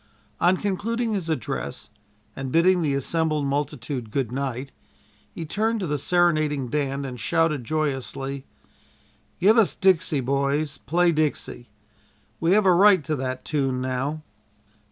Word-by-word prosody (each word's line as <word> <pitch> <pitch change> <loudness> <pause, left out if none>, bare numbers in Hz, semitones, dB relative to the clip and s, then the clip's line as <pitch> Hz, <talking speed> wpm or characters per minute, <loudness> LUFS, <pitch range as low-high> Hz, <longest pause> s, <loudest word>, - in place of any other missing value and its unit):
On 180 +2 +4
concluding 225 +4 -1
his 185 -5 -3
address 70 - -4 0.4
and 135 -1 -5
bidding 180 +3 +4
the 145 -4 0
assembled 155 +1 0
multitude 140 -3 -3
good 120 0 -2
night, 135 0 -3 0.6
he 165 - -6
turned 220 +7 0
to 190 - -2
the 150 -3 -2
serenading 155 -5 +1
band 140 0 -1
and 125 -2 -6
shouted 165 +1 +1
joyously: 135 -1 -3 1.0
"Give 215 +5 +5
us 215 - +3
'Dixie,' 180 -5 +2
boys; 140 +2 -1
play 170 +10 +2
'Dixie.' 150 -6 -2 0.7
We 165 +2 +3
have 210 0 +4
a 185 - +6
right 190 -2 +6
to 155 +2 -1
that 130 0 -4
tune 135 -4 0
now." 130 +4 -2
150 Hz, 135 wpm, -24 LUFS, 135-175 Hz, 1.0 s, a